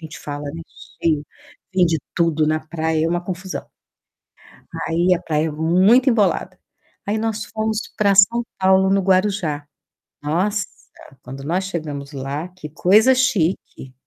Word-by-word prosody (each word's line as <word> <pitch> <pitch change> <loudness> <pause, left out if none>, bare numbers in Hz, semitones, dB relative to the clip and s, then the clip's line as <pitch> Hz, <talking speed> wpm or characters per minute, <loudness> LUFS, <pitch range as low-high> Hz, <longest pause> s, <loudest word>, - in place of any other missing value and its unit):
gente 160 -1 -9
fala, 145 0 -6
né. 165 +1 -7 0.4
Cheio. 155 -3 +1 0.5
Vende 170 -4 +3 0.2
tudo 160 -2 +2
na 155 0 +1
praia, 160 0 -1
é - - +1
uma 175 +1 -1
confusão. 185 +1 -6 1.2
Aí 170 +2 +3
a 175 - -1
praia 155 0 -1
muito 185 - +4
embolada. 190 -5 +1 0.5
Aí 210 +2 0
nós 220 -1 -2
fomos 220 0 -2 0.2
pra 200 -2 +3
São 230 +4 +5
Paulo, 190 0 +4
no 195 0 +3
Guarujá. 185 -6 0 0.5
Nossa, 185 +8 0 0.6
quando 135 +2 -9
nós 180 +5 -1
chegamos 150 -6 -5
lá, 140 +4 -4
que 180 -4 -10
coisa 215 - +4
chique. 190 - -1
175 Hz, 135 wpm, -21 LUFS, 155-200 Hz, 1.2 s, São